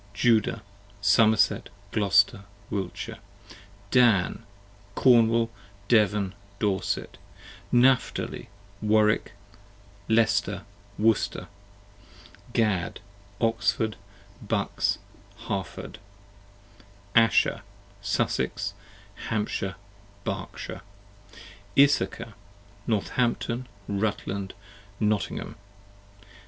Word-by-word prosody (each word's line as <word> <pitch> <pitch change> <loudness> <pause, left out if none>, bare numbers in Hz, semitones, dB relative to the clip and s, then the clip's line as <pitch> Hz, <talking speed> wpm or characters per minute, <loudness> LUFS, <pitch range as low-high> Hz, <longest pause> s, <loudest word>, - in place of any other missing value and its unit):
Judah, 110 -1 +2 0.4
Somerset, 110 +2 +4 0.2
Glouster, 100 -1 +3 0.3
Wiltshire. 100 +3 -4 0.7
Dan, 115 -10 +3 0.5
Cornwall, 115 -2 +4 0.4
Devon, 105 -4 +3 0.2
Dorset. 100 -3 -1 0.5
Napthali, 125 +1 +2 0.3
Warwick, 105 -2 +2 0.8
Leicester, 110 -1 +2 0.3
Worcester. 110 0 +1 1.0
Gad, 100 -6 0 0.4
Oxford, 115 -1 +1 0.5
Bucks, 100 -1 0 0.4
Harford. 95 -1 -5 1.1
Asher, 115 -1 +4 0.4
Sussex, 100 0 -1 0.6
Hampshire, 105 -3 -1 0.5
Berkshire. - - -5 1.0
Issachar, 135 -5 +3 0.5
Northampton, 120 +2 0 0.2
Rutland, 100 -1 -2 0.4
Nottgham. 105 -1 -1
110 Hz, 55 wpm, -27 LUFS, 100-115 Hz, 1.1 s, Somerset